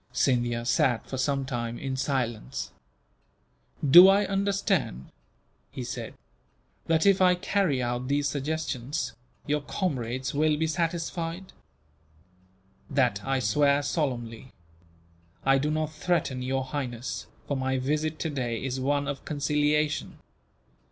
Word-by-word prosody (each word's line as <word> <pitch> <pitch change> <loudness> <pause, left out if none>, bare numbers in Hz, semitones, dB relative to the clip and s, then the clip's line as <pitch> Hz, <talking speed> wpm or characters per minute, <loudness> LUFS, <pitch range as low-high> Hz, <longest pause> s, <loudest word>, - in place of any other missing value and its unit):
Scindia 120 -2 +1
sat 120 0 +2
for 130 - -5
some 135 0 0
time, 120 -3 -3
in 135 -1 -3
silence. 120 - -2 1.2
"Do 175 +7 +11
I 200 +1 +5
understand," 195 - -1 0.6
he - - -6
said, - - -6 0.7
"that 165 +1 +2
if 195 -1 +5
I 180 -1 +6
carry 180 -8 0
out 120 +1 -2
these 145 +1 +1
suggestions, 140 -3 -3 0.3
your 150 0 0
comrades 130 - -2
will 150 +1 +2
be 160 - +1
satisfied?" 165 +2 -3 1.4
"That 125 -8 +1
I 135 0 0
swear 140 +5 +2
solemnly. 125 -7 -2 1.0
I 135 0 +5
do 150 +2 0
not 155 0 -1
threaten 155 -5 -1
Your 135 +1 -1
Highness, 130 -3 -4 0.2
for 140 - -1
my 130 0 0
visit 150 +4 -1
today 130 -8 -3
is 130 0 -2
one 140 +2 0
of 145 -2 -4
conciliation. 150 +1 0
140 Hz, 120 wpm, -27 LUFS, 125-155 Hz, 1.4 s, Do